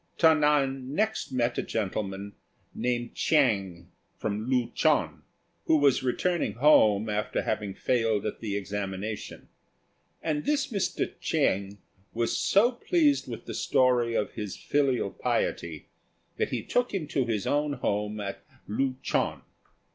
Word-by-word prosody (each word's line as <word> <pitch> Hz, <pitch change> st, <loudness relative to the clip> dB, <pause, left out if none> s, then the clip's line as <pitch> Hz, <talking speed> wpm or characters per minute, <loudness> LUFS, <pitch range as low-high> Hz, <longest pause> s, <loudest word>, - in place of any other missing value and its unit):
Ta 160 Hz, -1 st, +6 dB
nan 140 Hz, -3 st, +1 dB
next 220 Hz, +3 st, 0 dB
met 120 Hz, -2 st, 0 dB
a -, -, +2 dB
gentleman 100 Hz, -1 st, -3 dB, 0.4 s
named 120 Hz, -1 st, -2 dB
Chiang, 100 Hz, -, +1 dB, 0.3 s
from 110 Hz, +3 st, -3 dB
Lu 125 Hz, -3 st, +1 dB
chou, -, -, +3 dB, 0.6 s
who 160 Hz, -, +4 dB
was 145 Hz, -3 st, +4 dB
returning 170 Hz, +7 st, 0 dB
home 110 Hz, -6 st, +5 dB
after 105 Hz, 0 st, -1 dB
having 105 Hz, -3 st, -2 dB
failed 115 Hz, -4 st, +1 dB
at -, -, -3 dB
the 105 Hz, -3 st, -3 dB
examination; 100 Hz, +1 st, -5 dB, 0.8 s
and 150 Hz, -2 st, -1 dB
this 290 Hz, -2 st, 0 dB
Mr. 200 Hz, -4 st, -1 dB
Chiang 100 Hz, +1 st, 0 dB, 0.4 s
was 115 Hz, 0 st, 0 dB
so 220 Hz, +5 st, +4 dB
pleased 290 Hz, +3 st, +2 dB
with -, -, -7 dB
the -, -, -6 dB
story 120 Hz, -2 st, +2 dB
of 105 Hz, -, 0 dB
his 105 Hz, -3 st, -6 dB
filial 140 Hz, -3 st, 0 dB
piety 80 Hz, -3 st, -2 dB, 0.5 s
that -, -, 0 dB
he -, -, -3 dB
took 245 Hz, 0 st, 0 dB
him 175 Hz, -5 st, -2 dB
to 140 Hz, -3 st, 0 dB
his 110 Hz, -4 st, -1 dB
own 145 Hz, 0 st, +1 dB
home 105 Hz, -4 st, -2 dB
at 100 Hz, -1 st, -5 dB, 0.2 s
Lu 130 Hz, +5 st, 0 dB
chou. -, -, +1 dB
120 Hz, 140 wpm, -28 LUFS, 105-150 Hz, 0.8 s, Ta